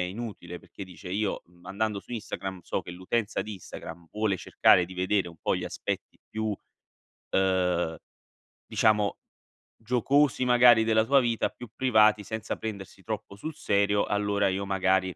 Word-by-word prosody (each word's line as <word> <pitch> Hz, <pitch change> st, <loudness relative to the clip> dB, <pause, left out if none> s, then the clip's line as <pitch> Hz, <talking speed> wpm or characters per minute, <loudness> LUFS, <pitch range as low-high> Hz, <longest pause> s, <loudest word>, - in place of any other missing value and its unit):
inutile, 90 Hz, -2 st, -5 dB
perché, 100 Hz, -, -11 dB
dice, 90 Hz, 0 st, -10 dB
io 100 Hz, +2 st, -1 dB, 0.2 s
andando 105 Hz, +1 st, -2 dB
su -, -, -21 dB
Instagram 95 Hz, -4 st, -5 dB
so -, -, -3 dB
che -, -, -9 dB
l'utenza 95 Hz, +5 st, -2 dB
di 110 Hz, -, -5 dB
Instagram 85 Hz, -3 st, -10 dB
vuole 105 Hz, -2 st, 0 dB
cercare 90 Hz, +1 st, +4 dB
di 95 Hz, +2 st, -10 dB
vedere 95 Hz, +1 st, +1 dB
un 85 Hz, -, -13 dB
po' -, -, +1 dB
gli -, -, -3 dB
aspetti -, -, -5 dB
più, 110 Hz, 0 st, -3 dB, 0.8 s
uhm, 90 Hz, -3 st, +1 dB, 0.7 s
diciamo, 105 Hz, -2 st, +2 dB, 0.6 s
giocosi 130 Hz, +4 st, +2 dB
magari 120 Hz, -2 st, +6 dB
della 110 Hz, 0 st, +3 dB
tua 140 Hz, +1 st, +5 dB
vita, 115 Hz, -2 st, +1 dB
più 120 Hz, -, -11 dB
privati, 110 Hz, -5 st, +4 dB
senza 110 Hz, +1 st, -4 dB
prendersi 100 Hz, -4 st, -7 dB
troppo 100 Hz, -, -6 dB
sul 155 Hz, +7 st, -6 dB
serio, 100 Hz, 0 st, +2 dB
allora 100 Hz, -1 st, +1 dB
io 95 Hz, +1 st, -2 dB
magari, 95 Hz, -1 st, +1 dB
100 Hz, 150 wpm, -28 LUFS, 95-110 Hz, 0.8 s, magari